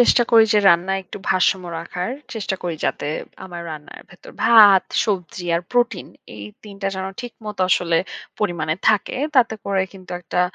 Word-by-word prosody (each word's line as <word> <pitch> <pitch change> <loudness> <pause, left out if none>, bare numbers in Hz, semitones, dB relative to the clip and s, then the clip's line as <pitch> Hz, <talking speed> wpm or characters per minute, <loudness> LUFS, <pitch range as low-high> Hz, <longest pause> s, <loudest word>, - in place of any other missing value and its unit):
চেষ্টা 245 0 +5
করি 225 -1 +7
যে, 210 - +4
রান্নায় 180 +3 +2
একটু 205 - -9
ভারসাম্য 185 0 +2
রাখার। 180 +4 -5 0.2
চেষ্টা 205 -3 -2
করি 175 -2 -3
যাতে - - -2 0.4
আমার 175 -2 -8
রান্নার 150 -1 -9
ভেতর 175 - -14
ভাত, 215 -4 +7 0.2
সবজি 185 -4 -3
আর - - -1
প্রোটিন 245 -5 +1 0.3
এই 105 -1 -8 0.2
৩ 210 -2 -11
টা - - 0
যেন 190 0 -4
ঠিকমত 220 -4 -9
আসলে 170 -2 +2 0.4
পরিমাণে 165 -6 -1
থাকে। 215 +1 +1 0.2
তাতে 235 -3 +4
করে 195 -1 +1
কিন্তু 185 -2 -14
একটা 180 +1 -2
190 Hz, 165 wpm, -21 LUFS, 175-215 Hz, 0.4 s, করি